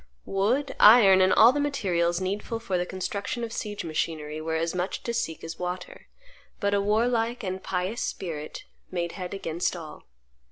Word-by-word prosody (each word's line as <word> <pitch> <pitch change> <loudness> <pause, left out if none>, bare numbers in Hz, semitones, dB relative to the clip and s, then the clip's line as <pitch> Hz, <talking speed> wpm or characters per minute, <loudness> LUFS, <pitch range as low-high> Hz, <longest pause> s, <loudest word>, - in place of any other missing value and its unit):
Wood, 225 +9 0
iron, 205 -4 +8
and 185 0 +4
all 225 +3 +7
the 290 - -1
materials 180 -12 0
needful 200 +4 -3
for 225 -5 -3
the 180 0 0
construction 200 +5 -4
of 230 -1 -4
siege 205 -4 -4
machinery 155 -1 -3
were 160 0 -2
as 165 +1 -1
much 180 +1 -3
to 235 - -3
seek 230 -9 -3
as 165 0 -7
water. 180 0 -6 0.5
But 200 -1 0
a 200 - +3
warlike 230 +3 +1
and 185 -1 -3
pious 190 +5 -2
spirit 155 -5 -5 0.3
made 170 -2 -2
head 185 0 -6
against 170 -2 -2
all. 160 -3 -9
190 Hz, 170 wpm, -26 LUFS, 170-220 Hz, 0.5 s, iron